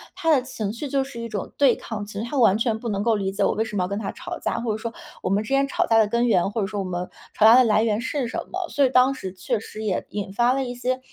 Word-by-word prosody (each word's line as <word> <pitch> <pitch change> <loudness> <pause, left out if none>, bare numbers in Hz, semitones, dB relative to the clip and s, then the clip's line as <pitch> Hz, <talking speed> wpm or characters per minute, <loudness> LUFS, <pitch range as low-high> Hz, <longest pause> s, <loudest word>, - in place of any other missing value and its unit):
他 340 -4 -1
的 275 - +4
情 215 -6 -4
绪 255 +6 -5
就 270 0 +1
是 265 -3 -9
一 230 - -4
种 205 -3 -5
对 275 -4 +5
抗， 210 -3 -6
其 210 - -11
实 200 +2 -4
他 285 - -3
完 225 -6 +5
全 225 -1 0
不 230 +1 -5
能 200 -2 -1
够 225 +1 +2
理 195 -1 -1
解 195 - -1
我 - - +2
为 220 - 0
什 210 - -7
么 185 - +1
要 180 - -1
跟 200 - -3
他 205 -2 -3
吵 - - -7
架， - - -2
或 230 -2 -2
者 215 - -2
说 225 +1 -5 0.3
我 - - -1
们 200 +3 +1
之 - - -9
间 275 0 +2
吵 - - 0
架 225 - +4
的 220 -1 +5
根 235 +3 +1
源， 195 -4 +2
或 220 - -2
者 195 - 0
说 205 0 -4
我 195 - -2
们 180 0 -4 0.2
吵 215 - +3
架 225 +2 +9
的 255 - +7
来 215 -2 +3
源 220 -1 +1
是 260 +1 -2
什 245 - -5
么。 370 -1 -3
所 285 - +3
以 - - +2
当 255 +1 +4
时 190 -9 -7
确 210 +5 -2
实 215 0 -8
也 200 -4 -1
引 200 -2 -4
发 240 +4 +3
了 270 - 0
一 245 -1 -5
些 255 +1 -1
225 Hz, 355 characters per minute, -24 LUFS, 205-255 Hz, 0.3 s, 架